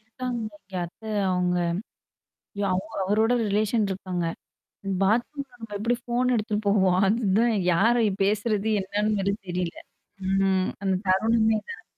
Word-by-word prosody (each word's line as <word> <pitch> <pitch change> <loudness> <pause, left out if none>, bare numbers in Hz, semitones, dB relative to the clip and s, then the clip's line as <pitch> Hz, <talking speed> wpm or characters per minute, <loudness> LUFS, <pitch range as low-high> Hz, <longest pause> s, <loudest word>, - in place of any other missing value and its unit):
இறுக்குறாங்க 240 +3 -5
அவுங்க 200 -1 -17
அத்த 170 - -19 0.3
அவங்க 180 -1 +1 1.0
ஐயோ! 200 - -1
அவ 185 - +1 0.2
அவரோட 220 +4 +2
ரிலேஷன் 210 +2 +1
இருக்காங்க. 185 -2 -3 0.8
பாத்ரூம்ல 245 +7 0
நம்ம 225 -2 -8
எப்டி 230 +3 +1
ஃபோன் 250 +1 +1
எடுத்துட்டு 215 -1 -1
போவோம். 190 -3 +3
அதுதான் 220 +1 +2 0.2
யார 225 +8 +4 0.3
பேசுறது 210 +1 +1
என்னன்னுது 205 +2 0
வேற 195 +1 +1
தெரில. 175 -1 -2 0.5
ம். 195 -1 +2
அந்த 190 -1 +1
தருணமே 220 +3 +3
இது - - -31
தான். 455 - -11
210 Hz, 130 wpm, -26 LUFS, 190-225 Hz, 1.0 s, யார